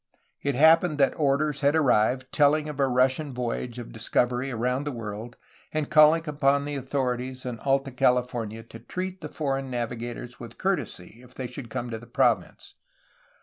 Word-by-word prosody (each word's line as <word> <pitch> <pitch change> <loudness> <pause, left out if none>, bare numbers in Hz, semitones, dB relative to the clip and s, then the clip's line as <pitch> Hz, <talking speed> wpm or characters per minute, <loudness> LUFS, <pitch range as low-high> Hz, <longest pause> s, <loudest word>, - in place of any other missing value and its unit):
It 140 -2 -1
happened 160 +3 +5
that 135 -2 +3
orders 145 0 +1
had 145 +2 +3
arrived 130 -3 +2
telling 150 +1 +3
of 150 -2 -7
a 135 - +3
Russian 130 +2 +1
voyage 120 0 -3
of 120 -2 -7
discovery 120 +3 0
around 125 +2 -1
the 145 - -3
world 115 0 -7 0.3
and 155 -2 -2
calling 155 +2 +6
upon 140 -1 +2
the 145 - -4
authorities 130 -1 -2
in 120 -3 -4
Alta 135 +1 0
California 120 -3 0
to 115 0 -12
treat 185 +9 -5
the 150 - -6
foreign 135 -3 -2
navi 120 -1 -3
gators 120 +1 -7
with 120 -1 -10
courtesy 150 - -3
if 125 0 -17
they 130 - -4
should 125 0 -7
come 120 +2 -4
to 110 - -4
the 120 - -14
province. 120 - 0
130 Hz, 175 wpm, -26 LUFS, 120-145 Hz, 0.3 s, calling